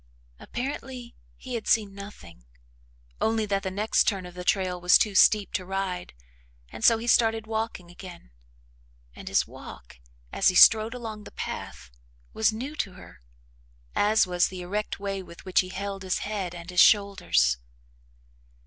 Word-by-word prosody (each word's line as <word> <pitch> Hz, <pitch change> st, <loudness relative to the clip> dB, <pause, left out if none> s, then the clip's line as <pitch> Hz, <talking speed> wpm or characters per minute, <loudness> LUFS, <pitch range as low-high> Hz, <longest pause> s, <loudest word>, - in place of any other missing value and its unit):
Apparently, 250 Hz, -1 st, -6 dB, 0.2 s
he 255 Hz, -, -8 dB
had 230 Hz, -2 st, -4 dB
seen 210 Hz, -4 st, +2 dB
nothing 145 Hz, -, -12 dB, 0.8 s
only 220 Hz, 0 st, +1 dB
that 200 Hz, -1 st, -1 dB
the 190 Hz, -, -3 dB
next 205 Hz, +4 st, +1 dB
turn 195 Hz, -4 st, 0 dB
of 180 Hz, -, -10 dB
the 180 Hz, 0 st, -7 dB
trail 180 Hz, -1 st, 0 dB
was 180 Hz, 0 st, +6 dB
too 210 Hz, -, 0 dB
steep 210 Hz, +1 st, +4 dB
to 185 Hz, -, -1 dB
ride, 185 Hz, -, -4 dB, 0.5 s
and -, -, -10 dB
so 230 Hz, -, +6 dB
he 225 Hz, -, -6 dB
started 225 Hz, -2 st, +3 dB
walking 220 Hz, -5 st, -4 dB
again, 175 Hz, -, -12 dB, 0.8 s
and -, -, -11 dB
his -, -, +2 dB
walk, -, -, -12 dB, 0.3 s
as -, -, +1 dB
he 185 Hz, -, +3 dB
strode 220 Hz, +5 st, +6 dB
along 220 Hz, -3 st, -7 dB
the -, -, -12 dB
path, -, -, -7 dB, 0.4 s
was 220 Hz, 0 st, +2 dB
new 255 Hz, +7 st, -6 dB
to 195 Hz, -, -3 dB
her, 65 Hz, -, -15 dB, 0.7 s
as 215 Hz, +1 st, +3 dB
was 180 Hz, -1 st, +1 dB
the 185 Hz, -1 st, -8 dB
erect 205 Hz, +4 st, -4 dB
way 195 Hz, -1 st, -3 dB
with 170 Hz, -1 st, -14 dB
which 185 Hz, -, +2 dB
he 185 Hz, -, 0 dB
held 195 Hz, +1 st, -5 dB
his 185 Hz, -1 st, -1 dB
head 195 Hz, -4 st, -4 dB
and 170 Hz, +1 st, -9 dB
his 180 Hz, -, 0 dB
shoulders. 185 Hz, -, +3 dB
195 Hz, 165 wpm, -26 LUFS, 180-220 Hz, 0.8 s, was